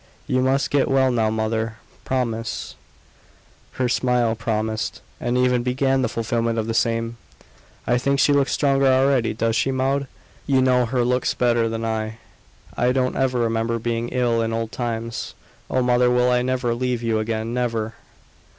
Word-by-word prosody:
"You 130 - +1
must 135 +2 +1
get 140 -2 +2
well 135 -1 +3
now, 115 -3 +1
mother. 110 0 -1 0.3
Promise!" 115 -4 -2 1.0
Her 130 - 0
smile 120 -2 +1
promised 110 -1 -2 0.2
and 120 +1 -1
even 125 -1 +2
began 130 +2 +1
the 125 - 0
fulfilment 115 0 -1
of 110 - 0
the 115 - -2
same. 115 0 0 0.7
"I 120 +1 +2
think 140 +2 +1
she 145 - +4
looks 140 -1 +2
stronger 135 -1 +2
already 130 -3 +3
does 115 0 0
she, 135 - +1
Maud? 135 +1 0 0.4
You 135 -2 +3
know 125 -2 +3
her 125 +1 0
looks 125 0 0
better 120 -2 +2
than 115 0 -3
I; 110 0 -3 0.6
I 125 +1 +2
don't 130 0 0
ever 130 -1 +1
remember 115 0 0
her - - -2
being 115 +1 -2
ill 120 -2 +1
in 115 0 -1
old 115 0 -2
times. 115 -1 -4 0.3
Oh, 130 - +1
mother, 125 0 +3
I - - +4
will 125 0 +3
never 125 -2 0
leave 125 0 -2
you 115 -1 +1
again 110 +1 -2
never!" 115 -3 -1
120 Hz, 170 wpm, -22 LUFS, 115-130 Hz, 1.0 s, she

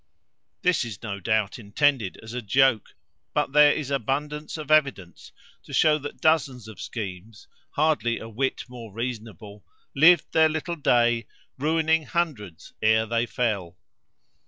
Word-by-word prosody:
This 180 -6 +2
is 110 -4 -8
no 100 -3 -5
doubt 105 +3 -1
intended 115 0 0
as 110 +1 -9
a 125 - -3
joke; 120 0 +2 0.4
but - - 0
there 150 0 +6
is 145 -2 -3
abundance 150 +4 -3
of 155 -1 -6
evidence 140 - 0 0.3
to - - -13
shew 155 -1 +4
that 145 0 -8
dozens 135 -7 +1
of 110 - -10
schemes, 105 -1 -7 0.3
hardly 145 -7 +1
a 110 - -8
whit 130 +4 -2
more 120 -3 -10
reasonable, 110 -2 -7 0.3
lived 165 +3 +6
their 160 0 +4
little 160 +2 -3
day, 120 -6 +2 0.3
ruining 160 +2 +1
hundreds 125 - -3
ere 110 +1 +3
they 115 +1 -1
fell. 100 -9 -2
125 Hz, 140 wpm, -25 LUFS, 110-150 Hz, 0.4 s, there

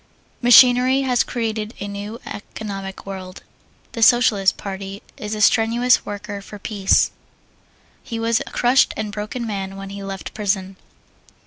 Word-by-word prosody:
Machinery 250 +2 +6
has 250 -3 +2
created 220 -2 -3
a 200 - -4
new 205 +3 -6
economic 195 -2 -7
world. 190 -2 -8 0.5
The 230 - -6
Socialist 220 -5 +4
Party 195 0 -7
is 210 +1 -5
a 210 - -4
strenuous 235 +4 +3
worker 205 0 -6
for 210 +1 -10
peace. 200 -1 +2 0.9
He 230 - -6
was 230 0 +1
a - - -4
crushed 245 +2 +2
and 215 -1 -3
broken 215 +3 -5
man 195 -3 -4
when 195 0 -8
he 200 0 -7
left 195 -1 -6
prison. 195 -2 -2
210 Hz, 140 wpm, -21 LUFS, 195-230 Hz, 0.9 s, Machinery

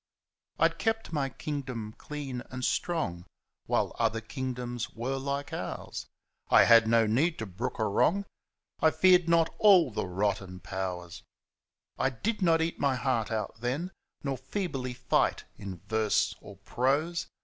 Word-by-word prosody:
I'd - - +2
kept 225 -5 -1
my 140 -3 0
kingdom 130 -7 -5
clean 140 -4 -6
and 130 0 -3
strong 95 - -1 0.4
While - - 0
other 110 - +1
kingdoms 125 0 -4
were 125 +4 -2
like 140 +1 -3
ours - - -5 0.2
— - - -53
I - - +7
had 115 -1 +7
no 115 0 +4
need 140 +11 +2
to 110 - -4
brook 110 +6 -4
a 110 - 0
wrong, 180 - +2 0.5
I 160 - +5
feared 180 0 +4
not 165 -1 +3
all 185 - +6
the 105 - -2
rotten 95 0 -2
Powers 90 -2 -5 0.8
I 130 - +3
did 210 - -3
not 165 -3 +4
eat 165 - -3
my 140 -2 +2
heart 125 -3 0
out 110 0 -3
then. 140 +10 -2 0.3
Nor 135 -2 -2
feebly 130 -4 -3
fight 125 0 +1
in 95 -3 -8
verse 110 -1 +2
or - - -12
prose. 145 +7 0
130 Hz, 150 wpm, -29 LUFS, 110-155 Hz, 0.8 s, I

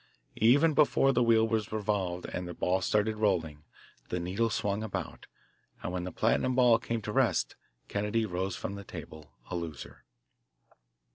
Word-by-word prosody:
Even 140 +9 +5
before 135 -2 +4
the 125 - +2
wheel 115 -1 +4
was 110 -2 -1
revolved 100 -5 -1
and 90 0 -5
the 90 - -7
ball 95 +1 +1
set 105 +3 +2
rolling, 80 -8 0 0.4
the 90 - -1
needle 95 +7 0
swung 105 -1 -1
about, 110 -3 -5 0.6
and - - -3
when 90 -1 -3
the 90 - -5
platinum 130 +9 +1
ball 120 -3 +5
came 115 -2 -3
to - - -4
rest - - +1 0.3
Kennedy 105 +2 0
rose 95 -1 -2
from 100 - -5
the 100 0 -7
table, 75 -5 -10 0.2
a - - -2
loser. 80 -5 -7
105 Hz, 160 wpm, -30 LUFS, 90-115 Hz, 0.6 s, Even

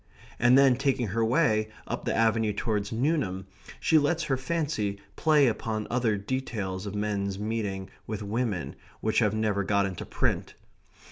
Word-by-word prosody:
and 120 +2 +6
then, 135 -2 +6
taking 130 -3 0
her 115 +4 0
way 110 -4 +2 0.2
up - - -4
the - - 0
avenue 115 -1 +2
towards 105 -1 -2
Newnham, 115 - 0 0.3
she 160 -3 +4
lets 160 +3 +1
her 135 - +1
fancy 130 -8 -2 0.2
play 150 -3 +4
upon 110 -2 -1
other 120 -4 +1
details 100 -4 -3
of 100 - -5
men's 100 -2 -1
meeting 105 -3 -3 0.2
with 110 -1 -4
women 105 -3 -2 0.3
which 110 - +2
have 110 -2 +2
never 105 -2 +1
got 100 0 +2
into 95 -3 -4
print. - - -2
110 Hz, 155 wpm, -28 LUFS, 100-130 Hz, 0.3 s, and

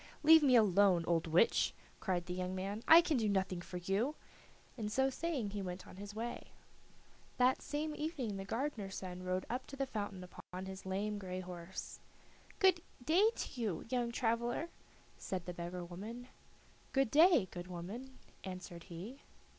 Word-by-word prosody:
"Let 320 +1 +9
me 270 -4 +5
alone, 195 -5 +5
old 165 -1 +1
witch," 165 +8 +3 0.2
cried 180 -3 -1
the 180 - -4
young 185 0 -3
man; 200 +3 -3
"I 330 +1 +10
can 320 -5 +1
do 220 -3 +1
nothing 190 -2 0
for 180 +1 -6
you," 195 - 0 0.6
and 215 -4 -3
so 265 +3 +2
saying 265 -8 -2
he 205 0 -3
went 180 0 -5
on - - -12
his 205 +1 -8
way. 235 +2 -5 0.8
That 255 +1 +4
same 300 +1 -2
evening 295 - -3
the 195 - -4
gardener's 220 -3 -3
son 180 -1 -6
rode 185 0 -1
up 250 +2 -3
to 275 - -8
the 275 0 -1
fountain 205 -6 -4
upon 180 +1 -8
his 190 0 -8
lame 205 +2 -1
gray 185 -1 -4
horse. 180 0 -7 0.6
"Good 375 -4 +5 0.2
day 370 - +5
to 245 - -5
you, 205 -7 -2
young 240 -2 0
traveler," 235 +6 0 0.5
said 185 -3 -4
the 180 - -4
beggar 175 +1 -5
woman. 220 +8 -8 0.6
"Good 270 -4 +2
day, 315 - +6
good 175 0 -6
woman," 210 +10 -7 0.3
answered 180 -2 -7
he. 195 +10 -8
205 Hz, 170 wpm, -36 LUFS, 185-255 Hz, 0.8 s, I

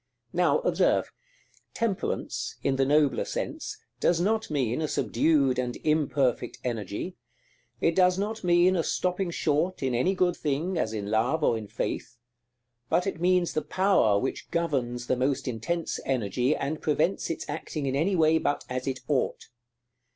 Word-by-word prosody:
Now, - - +3
observe: - - +2 0.6
Temperance, 225 -5 -2
in 135 -1 +1
the 135 - +3
nobler 145 -4 +3
sense, - - -4 0.2
does 170 -1 +2
not 220 +5 0
mean 130 -2 0
a 155 - 0
subdued 140 -5 +2
and 125 -1 -2
imperfect 145 -5 +1
energy; 115 - -4 0.6
it 165 - +2
does 180 -1 +4
not 215 +2 -3
mean 175 +1 +4
a 170 - +2
stopping 180 +2 -1
short 165 +1 0
in 130 -2 0
any 175 +11 +2
good 180 -1 +2
thing, 155 +5 -1
as 110 -9 0
in 105 -2 -4
Love 125 +9 +1
or 115 - +3
in 110 -2 -5
Faith; 120 - -4 0.7
but 180 - +2
it 195 -4 -3
means 180 -1 +2
the 155 - 0
power 185 - +3
which 130 +6 -3
governs 130 -8 -1
the 130 - +1
most 130 +2 0
intense 130 +9 -2
energy, 125 +2 0
and 150 +3 -3
prevents 155 +5 0
its 165 - -4
acting 150 0 -4
in 135 0 0
any 175 +7 +1
way 160 -1 +4
but 145 - -1
as 130 +1 -3
it 130 -1 -2
ought. 140 -3 -1
150 Hz, 160 wpm, -27 LUFS, 130-175 Hz, 0.7 s, does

